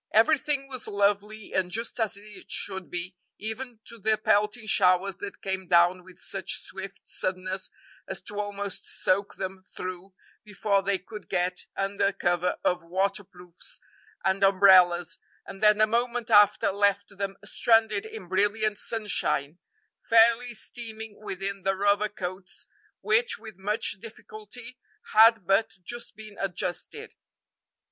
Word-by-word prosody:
Everything 275 +4 +3
was 255 -4 -5
lovely 205 +1 0
and 185 -1 +1
just 225 +5 -3
as 220 -3 0
it 205 -2 -11
should 190 -2 -3
be, 175 +1 -5 0.2
even 225 +1 -5
to 235 - -9
the 215 +1 +2
pelting 210 +2 +1
showers 185 -1 +3
that 200 0 -8
came 190 -1 -3
down 175 +1 +4
with 185 0 -16
such 195 -1 -1
swift 195 +1 -8
suddenness 185 0 -3 0.4
as - - -5
to 205 0 -3
almost 205 -1 -4
soak 195 +2 +1
them 190 0 -5
through 185 +1 -6 0.3
before 205 -1 0
they 195 0 0
could 210 +2 -11
get 180 0 -1
under 195 0 +1
cover 175 -1 0
of 180 -1 +1
waterproofs 185 - -4 0.5
and 190 +1 +2
umbrellas, 185 -3 +5 0.3
and 195 - -10
then 210 0 +5
a 215 - +7
moment 235 +1 -1
after 205 -1 +6
left 200 0 +1
them 195 -1 -3
stranded 220 -1 +3
in 220 -4 -9
brilliant 205 +3 +1
sunshine, 190 -8 -2 0.5
fairly 230 +2 +5
steaming 220 -1 -7
within 195 -1 -4
the 195 +1 +1
rubber 205 +2 +2
coats 185 -1 -6 0.4
which, 470 +2 +2
with 220 -2 -11
much 210 +4 -1
difficulty, 225 +3 -11 0.3
had 225 -2 +7
but 195 +3 +2
just 240 +5 -6
been 215 -1 -12
adjusted. 195 - -3
200 Hz, 135 wpm, -27 LUFS, 190-220 Hz, 0.5 s, a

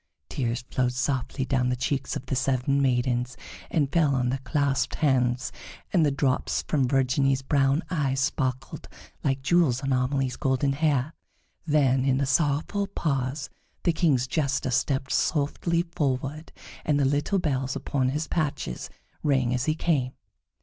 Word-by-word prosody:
Tears 120 -3 -2
flowed 125 -1 +1
softly 130 +1 -1
down 130 -2 +1
the 125 - +1
cheeks 130 +2 -2
of 130 - -5
the 130 - -2
seven 135 +1 +1
maidens, 125 -1 0 0.3
and 145 -4 0
fell 150 -5 +3
on 125 -1 +1
their 135 +2 -1
clasped 140 0 0
hands, 125 -3 +1 0.4
and 175 -4 +4
the 150 - +4
drops 135 -2 0
from 140 -5 +1
Virginie's 135 +1 +2
brown 140 +2 +2
eyes 140 -6 0
sparkled 135 -1 -2 0.3
like 135 -1 0
jewels 140 -4 +3
on 135 0 +1
Amelie's 130 0 0
golden 135 +1 +1
hair. 145 -1 +1 0.5
Then, 135 -4 +3
in 135 -1 +2
the 140 - +1
sorrowful 150 +8 +1
pause, 135 -6 -2 0.3
the 170 - +2
King's 145 -7 +2
Jester 140 -2 -1
stepped 135 +1 0
softly 170 +3 +1
forward, 140 +2 -2 0.3
and 145 -2 +1
the 140 - +3
little 145 +8 +1
bells 135 -6 -1
upon 130 -2 0
his 150 +4 -2
patches 150 - -2 0.3
rang 130 -4 +2
as 125 0 0
he 155 - +1
came. 140 -7 0
135 Hz, 150 wpm, -26 LUFS, 130-145 Hz, 0.5 s, and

